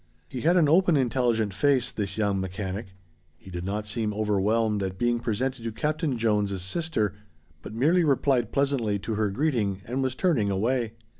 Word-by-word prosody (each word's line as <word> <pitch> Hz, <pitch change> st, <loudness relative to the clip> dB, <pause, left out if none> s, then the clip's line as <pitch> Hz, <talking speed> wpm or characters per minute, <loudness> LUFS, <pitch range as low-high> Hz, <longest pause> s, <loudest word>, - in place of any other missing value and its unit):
He 125 Hz, -, -6 dB
had 175 Hz, +3 st, +3 dB
an 165 Hz, -4 st, +4 dB
open, 170 Hz, +1 st, +4 dB
intelligent 120 Hz, -5 st, +1 dB
face 125 Hz, +3 st, +2 dB
this 100 Hz, -1 st, -3 dB
young 100 Hz, -3 st, +1 dB
mechanic. 95 Hz, +1 st, -5 dB, 0.4 s
He 95 Hz, -, -13 dB
did 90 Hz, -1 st, -5 dB
not 105 Hz, +3 st, -3 dB
seem 105 Hz, -1 st, -2 dB
overwhelmed 105 Hz, +1 st, +1 dB
at 95 Hz, -1 st, -3 dB
being 120 Hz, +2 st, +1 dB
presented 125 Hz, +2 st, -2 dB
to 115 Hz, -, -3 dB
Captain 150 Hz, +3 st, -1 dB
Jones' 105 Hz, -4 st, 0 dB
sister, 110 Hz, -, -1 dB, 0.5 s
but 110 Hz, -, -9 dB
merely 160 Hz, +9 st, +3 dB
replied 135 Hz, -5 st, +2 dB
pleasantly 135 Hz, -7 st, +1 dB
to 110 Hz, +3 st, -4 dB
her 105 Hz, -1 st, 0 dB
greeting 105 Hz, -6 st, -1 dB
and 125 Hz, +3 st, -2 dB
was 130 Hz, -1 st, -1 dB
turning 130 Hz, -, +1 dB
away. 115 Hz, +3 st, 0 dB
115 Hz, 170 wpm, -26 LUFS, 100-135 Hz, 0.5 s, an